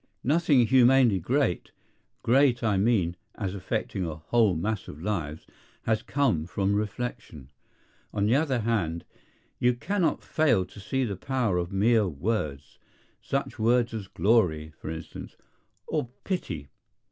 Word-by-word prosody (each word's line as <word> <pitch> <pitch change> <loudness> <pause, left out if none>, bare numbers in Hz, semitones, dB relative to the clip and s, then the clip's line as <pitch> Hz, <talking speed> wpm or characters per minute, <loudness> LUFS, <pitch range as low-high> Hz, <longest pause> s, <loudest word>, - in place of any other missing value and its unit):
Nothing 145 -3 +4
humanely 125 -3 +5
great—great, 125 - 0
I 105 -3 +2
mean, 95 -4 +2 0.2
as 95 -3 -3
affecting 100 0 -3
a 80 -3 -3
whole 100 +5 +2
mass 105 +5 -2
of 75 - -9
lives—has 100 +4 -4
come 120 - 0
from 100 +2 0
reflection. 105 - -4 0.6
On 100 -1 0
the 110 - +3
other 135 -4 +2
hand, 95 -8 -1 0.5
you 125 0 +3
cannot 185 +7 0
fail 145 -12 +2
to 105 - -14
see 130 +7 -1
the 105 -5 -2
power 115 -3 0
of 85 0 -3
mere 105 +2 +3
words; 75 -4 -3 0.4
such - - -3
words 120 +1 +2
as 105 -4 -5
Glory, 80 -6 +1
for - - -8
instance, 80 0 -8 0.5
or 120 - -2
Pity. 85 - -4
105 Hz, 130 wpm, -27 LUFS, 90-125 Hz, 0.6 s, humanely